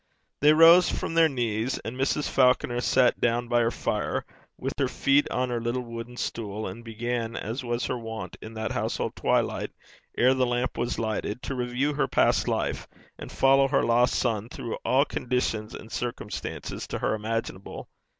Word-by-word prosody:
They 150 +1 +6
rose 165 +3 +7
from - - -3
their 165 -1 +5
knees, 120 -2 -1
and 115 - -4
Mrs. 135 +3 0
Falconer 125 -2 +2
sat 125 0 +3
down 120 +1 +1
by 120 0 +2
her 115 -1 +3
fire, - - -2 0.3
with - - -3
her - - +2
feet 140 +1 +2
on 125 0 -1
her 120 -1 -1
little 120 +2 -2
wooden 115 +1 -8
stool, 110 -3 -4
and 95 +5 -7
began, 115 0 -3
as 115 +6 -4
was 120 0 -2
her 125 - -2
wont 115 -1 -6
in 110 +1 -9
that 110 0 -3
household - - -2
twilight, - - 0 0.5
ere 130 +2 +5
the 130 -1 +1
lamp 120 +1 -1
was 120 - -2
lighted, 110 0 -3
to - - -3
review 125 +3 -1
her 145 - 0
past - - +2
life, - - -1 0.3
and - - -8
follow 135 0 +4
her 140 - +2
lost 120 +1 +3
son 115 -2 0
through 115 - -5
all 135 +3 +3
conditions 120 -5 -2
and 110 - -10
circumstances 120 -3 -5
to - - -3
her - - 0
imaginable. 110 -2 -4
120 Hz, 180 wpm, -26 LUFS, 115-130 Hz, 0.5 s, rose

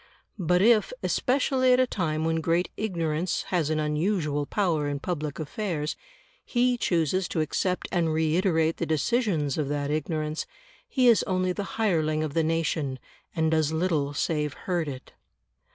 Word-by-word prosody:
But 180 +1 +2
if, 225 - +4
especially 260 -1 +2
at 250 - +4
a 255 - +5
time 160 -9 -1
when 165 0 0
great 170 +2 +1
ignorance 170 -4 -1
has 170 -5 +1
an 155 -1 0
unusual 150 -1 0
power 170 -8 0
in 145 -1 -2
public 150 -3 -3
affairs, 155 -1 -3 0.5
he 245 0 +2
chooses 175 - 0
to - - -2
accept 180 +4 -1
and 170 -3 +1
reiterate 160 +1 +1
the - - -2
decisions 160 - 0
of 145 -2 -1
that 145 0 -1
ignorance, 155 0 -2 0.4
he 260 - +2
is 235 -2 +6
only 185 -1 +1
the 200 +2 -5
hireling 155 -8 +1
of 155 -2 -3
the 165 - +2
nation, 155 -4 -1 0.4
and 160 -1 +1
does 160 -1 +2
little 160 -4 0
save 150 -1 -1
hurt 175 -4 0
it. 130 -2 -8
160 Hz, 155 wpm, -27 LUFS, 155-185 Hz, 0.5 s, is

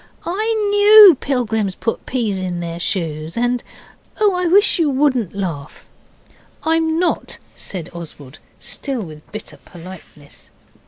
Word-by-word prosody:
'I 430 +6 -1 0.2
KNEW 410 -3 +8
pilgrims 220 -7 -1
put 230 - -4
peas 225 -7 -1
in 180 -2 -4
their 170 0 -5
shoes 165 -3 -3
and 245 +1 0 0.6
oh, 415 -2 +3
I 360 0 -1
wish 400 +2 +4
you 320 -3 +2
wouldn't 260 - 0
laugh!' 165 -7 -6 0.8
'I'm 320 0 +1
not,' 355 +1 -1 0.2
said 175 -4 -6
Oswald, 155 -4 -10 0.2
still 265 -6 -4
with 155 -3 -12
bitter 215 0 -7
politeness. 170 -4 -14
220 Hz, 125 wpm, -19 LUFS, -, 0.8 s, KNEW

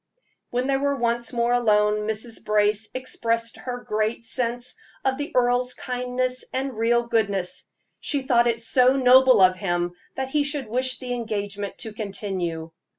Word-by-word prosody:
When 250 +1 -1
they 270 0 +2
were 280 +1 0
once 235 -2 -1
more 235 0 +1
alone, 210 -3 +2
Mrs. 220 +1 -3
Brace 210 0 +1
expressed 230 -2 -2
her 245 -1 -6
great 215 +2 -1
sense 245 +1 -2 0.3
of 265 0 +1
the 290 +3 -4
earl's 250 0 +2
kindness 250 0 -2
and 265 -1 -3
real 235 +2 +2
goodness. 200 -6 0 0.3
She 285 -3 -1
thought 240 -2 +3
it 230 -1 +1
so 255 +3 +3
noble 255 -3 +6
of 185 0 +5
him 175 -2 -1 0.2
that 265 0 -3
he 295 +1 +2
should 285 -3 -2
wish 255 +2 +1
the 250 -1 -4
engagement 205 -4 -4
to 220 - -5
continue. 190 -6 -4
235 Hz, 155 wpm, -24 LUFS, 210-255 Hz, 0.3 s, noble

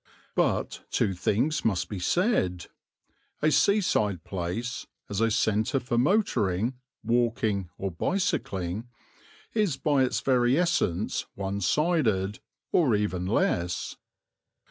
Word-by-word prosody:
But - - 0
two 95 - +1
things 105 - 0
must 100 -6 +1
be 100 - -5
said. 90 - +1 0.8
A 155 - +4
seaside 110 - +2
place, 100 +7 -4 0.2
as 105 +1 -2
a 115 - +3
centre 110 +4 +1
for 125 -1 -3
motoring, 120 - +2 0.3
walking 115 -5 0
or 95 -1 -3
bicycling, 100 - -2 0.7
is 205 -11 +1
by 145 -3 +2
its 130 - 0
very 125 0 +3
essence 110 - 0
one 100 0 -3
sided 110 - +1 0.3
or 135 -11 +3
even 95 -3 -1
less. 90 -3 0
110 Hz, 110 wpm, -27 LUFS, 95-140 Hz, 0.8 s, A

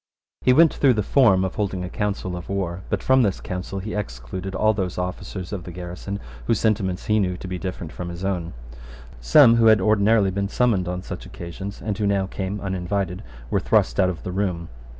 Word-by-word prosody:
He 130 - +4
went 160 +5 +6
through 130 -4 +3
the 105 - 0
form 100 -7 +4
of 95 - -3
holding 95 -3 -2
a - - -3
council 100 -3 -2
of 90 0 -8
war; 95 -2 -2
but - - -1
from 130 0 +4
this 100 -5 +1
council 90 +2 -5
he 100 +3 -5
excluded 95 +1 -5
all 110 +2 +3
those 95 -4 -3
officers 90 +1 -5
of 95 -4 -4
the 90 - -8
garrison 90 +3 -6 0.3
whose - - +2
sentiments 100 -4 0
he 110 0 +2
knew 90 -3 0
to 95 - -8
be 90 -1 -4
different 90 -4 -5
from 90 -1 -6
his 85 +2 -6
own. 90 -5 -2 0.6
Some, - - +6
who 115 -1 +5
had 110 -1 +7
ordinarily 105 0 +3
been 100 +1 -2
summoned 105 -6 +1
on 90 0 -3
such 95 - -7
occasions, 95 +2 -7
and 105 -2 -2
who 105 - +1
now 100 -1 +1
came 95 +1 -4
uninvited, 95 -1 -2 0.3
were - - +2
thrust - - +2
out 95 - +4
of 85 -2 -5
the 90 - -4
room. 90 -3 -2
95 Hz, 210 wpm, -23 LUFS, 90-105 Hz, 0.6 s, had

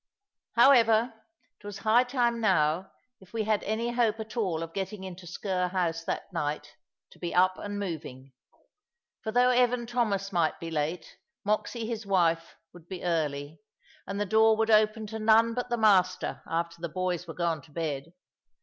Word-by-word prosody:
However, 235 -2 +5 0.5
it - - -26
was 205 -1 -6
high 220 +5 +4
time 240 -2 0
now, 180 -3 +2 0.3
if 190 +1 -19
we 225 -1 -1
had 215 -1 +1
any 225 +3 -2
hope 230 -2 +1
at 220 0 -7
all 180 -8 -1
of 165 0 -8
getting 195 0 -4
into 185 -1 -9
Sker 180 +1 -2
house 170 -3 -1
that 195 - -4
night, 150 -2 -3 0.4
to - - -18
be 175 - -4
up 185 +1 +3
and 205 0 -5
moving. 145 -9 -6 0.9
For 220 - -4
though 245 +2 +4
Evan 250 -1 +2
Thomas 215 -5 -1
might 170 -4 +1
be 165 0 -6
late, 160 +3 -3 0.3
Moxy, 215 +2 -1
his 225 -1 -4
wife, 170 -4 +1 0.2
would 175 -1 -15
be 185 -1 -7
early; 150 -3 -2 0.5
and 200 +1 -4
the 205 - 0
door 220 +2 +4
would 225 0 +1
open 215 0 +3
to 220 +1 -6
none 225 +1 +4
but 245 +1 -3
the 240 - 0
master 190 -4 +2
after 170 0 -3
the 170 - -3
boys 180 +1 -2
were 165 - -7
gone 170 -3 -1
to 160 - -20
bed. 155 -1 -4
195 Hz, 175 wpm, -28 LUFS, 170-220 Hz, 0.9 s, However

